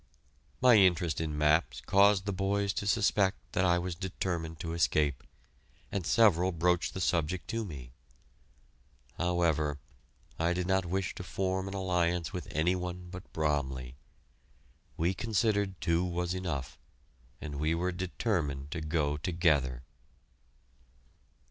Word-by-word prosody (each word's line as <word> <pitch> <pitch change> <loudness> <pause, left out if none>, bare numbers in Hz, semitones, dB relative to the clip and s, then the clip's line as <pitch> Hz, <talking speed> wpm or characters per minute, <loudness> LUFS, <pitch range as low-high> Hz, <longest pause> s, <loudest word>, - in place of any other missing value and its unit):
My 125 -3 +7
interest 90 -5 +3
in 75 -2 -3
maps 75 -5 +2
caused 100 -1 +4
the 100 - -1
boys 100 +1 0
to 100 - -3
suspect 100 -2 +2
that 90 - +1
I 90 -1 +4
was 90 0 -3
determined 85 -3 -4
to 80 -1 -4
escape, 75 -5 +1 0.7
and 95 -4 -2
several 95 -5 +4
broached 90 +1 +1
the - - -3
subject 85 0 0
to 115 0 -1
me. 70 - -8 1.3
However, 80 -4 +1 0.6
I 85 +2 +2
did 90 0 -2
not 95 0 +1
wish 95 +2 -1
to - - -7
form 95 0 -2
an 95 - -5
alliance 90 -2 0
with 90 -4 -5
any 85 +5 +1
one 90 0 -5
but 90 0 -10
Bromley. 65 -5 -2 1.0
We 85 +3 +1
considered 100 -3 0
two 85 +1 +1
was 90 0 -2
enough, 80 -8 -4 0.6
and 75 -2 -6
we 80 +2 +1
were 90 +2 -1
determined 85 - -2
to 85 -2 -3
go 75 -2 0
together. 75 -7 +1
90 Hz, 135 wpm, -31 LUFS, 80-95 Hz, 1.3 s, My